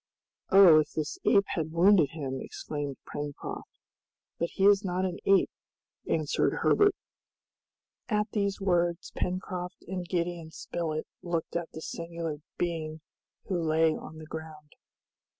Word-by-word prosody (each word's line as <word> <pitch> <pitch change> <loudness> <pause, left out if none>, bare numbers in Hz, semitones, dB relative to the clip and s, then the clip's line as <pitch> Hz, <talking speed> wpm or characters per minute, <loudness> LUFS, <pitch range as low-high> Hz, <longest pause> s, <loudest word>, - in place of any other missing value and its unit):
"Oh, 185 -5 +9
if 155 - -1
this 155 -2 -3
ape 200 0 +5
had 160 -3 -2
wounded 170 -2 +5
him!" 135 -4 -4
exclaimed 145 -3 -5
Pencroft. 145 -1 -6 0.7
"But 170 - 0
he 195 - +2
is 205 0 +6
not 185 0 0
an 180 -2 -3
ape," 195 -1 +5 0.6
answered - - +1
Herbert. 410 -2 +5 1.1
At 210 -1 +1
these 200 -2 0
words 175 -3 +1
Pencroft 180 0 -4
and 180 0 -3
Gideon 170 -2 -2
Spilett 160 -1 -3 0.2
looked 170 -2 -3
at 170 -1 -2
the 160 - -7
singular 165 -2 -4 0.2
being 160 -2 -2 0.4
who 180 -4 -1
lay 160 0 +3
on 160 - -9
the 155 - -9
ground. 155 -1 -9
170 Hz, 135 wpm, -29 LUFS, 155-185 Hz, 1.1 s, Oh